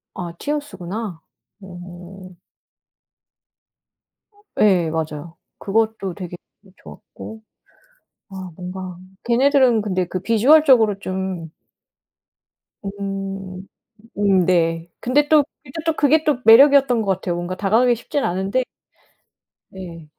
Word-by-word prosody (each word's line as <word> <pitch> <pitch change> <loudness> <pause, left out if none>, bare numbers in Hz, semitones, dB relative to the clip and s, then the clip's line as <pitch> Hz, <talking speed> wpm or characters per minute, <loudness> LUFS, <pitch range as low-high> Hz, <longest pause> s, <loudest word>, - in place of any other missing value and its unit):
아 175 -2 -5
티어스구나. 210 - -5 0.4
어. 180 0 -11 2.3
예 180 -6 +4
맞아요. 160 0 -5 0.2
그것도 215 -2 -1
되게 180 -1 -8 0.4
좋았고. 220 0 -12 0.9
아 190 -1 -8
뭔가 180 0 -7 0.3
걔네들은 255 -1 +3
근데 185 -3 -1
그 185 - -4
비주얼적으로 230 - +4
좀 185 -4 -5 1.3
음 195 -1 -6 0.5
음 195 -3 +3
네. 165 -1 +1
근데 290 +4 +1
또 305 -2 +6 0.2
이제 260 - -13
또 325 - +2
그게 305 +2 +3
또 300 -5 +1
매력이었던 265 +1 +6
것 195 - 0
같아요. 180 -1 -4
뭔가 175 +1 -4
다가가기 225 +6 +2
쉽진 280 +5 -3
않은데 190 +8 -1 1.1
네. 170 -4 -10
195 Hz, 205 characters per minute, -20 LUFS, 180-235 Hz, 2.3 s, 또